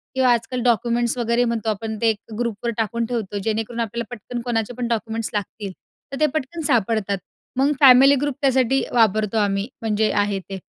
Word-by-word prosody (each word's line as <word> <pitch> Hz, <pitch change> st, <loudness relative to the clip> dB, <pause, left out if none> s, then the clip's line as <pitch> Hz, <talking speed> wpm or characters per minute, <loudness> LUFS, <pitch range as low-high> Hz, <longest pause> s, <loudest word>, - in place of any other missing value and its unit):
किंवा 260 Hz, -1 st, +3 dB
आजकाल 240 Hz, +2 st, -2 dB
डॉक्युमेंट्स 235 Hz, +1 st, +1 dB
वगैरे 235 Hz, +1 st, +1 dB
म्हणतो 225 Hz, -2 st, -1 dB
आपण 220 Hz, +1 st, -3 dB
ते 225 Hz, -1 st, +4 dB, 0.3 s
ग्रुपवर 235 Hz, 0 st, -2 dB
टाकून 230 Hz, +1 st, -1 dB
ठेवतो 220 Hz, -4 st, -3 dB
जेणेकरून 225 Hz, +1 st, -2 dB
आपल्याला 230 Hz, 0 st, -2 dB
पटकन 240 Hz, +3 st, -6 dB
कोणाचे 235 Hz, -1 st, -2 dB
पण 245 Hz, -1 st, -2 dB
डॉक्युमेंट्स 225 Hz, -1 st, -2 dB
लागतील, 205 Hz, -1 st, -4 dB, 0.4 s
तर 275 Hz, -, -5 dB
ते 305 Hz, -, +4 dB
पटकन 315 Hz, +3 st, -3 dB
सापडतात. 220 Hz, -5 st, +1 dB, 0.4 s
मग 275 Hz, +2 st, +3 dB
फॅमिली 270 Hz, +1 st, +8 dB
ग्रुप 290 Hz, -3 st, -1 dB
त्यासाठी 265 Hz, -1 st, +3 dB
वापरतो 215 Hz, -2 st, +2 dB
आम्ही, 200 Hz, 0 st, +1 dB
म्हणजे 215 Hz, -1 st, +1 dB
आहे 205 Hz, -1 st, 0 dB
ते. 195 Hz, +1 st, -8 dB
230 Hz, 170 wpm, -22 LUFS, 215-245 Hz, 0.4 s, फॅमिली